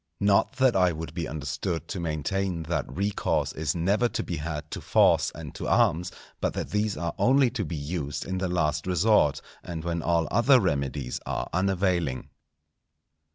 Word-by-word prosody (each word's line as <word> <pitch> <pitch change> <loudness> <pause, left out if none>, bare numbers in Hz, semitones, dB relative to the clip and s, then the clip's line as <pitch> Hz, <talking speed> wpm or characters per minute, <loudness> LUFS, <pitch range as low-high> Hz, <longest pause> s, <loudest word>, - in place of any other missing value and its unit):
Not 100 +5 +3
that 130 -2 +3
I 90 -2 +4
would 80 0 -6
be 85 -3 -3
understood 80 +4 -3
to 95 - -4
maintain 85 +2 -2
that 80 -5 -2
recourse 100 +7 -1
is 80 0 -2
never 100 +8 +2
to - - -2
be 85 - -4
had 75 0 -5
to - - -5
force - - +3
and 75 -4 -8
to - - -5
arms, 85 +3 +2 0.3
but - - -1
that - - -4
these 105 0 0
are 85 -2 -2
only 130 -1 +4
to 120 -4 -2
be 80 -1 -4
used 75 -1 -4
in 95 0 -3
the 95 -1 -1
last 75 -2 0
resort, 90 -4 +3 0.2
and 80 -2 -6
when 85 -1 -2
all 85 -1 +1
other 125 +5 +5
remedies 70 - -1
are - - -2
unavailing. 90 -7 0
85 Hz, 175 wpm, -27 LUFS, 80-100 Hz, 0.3 s, other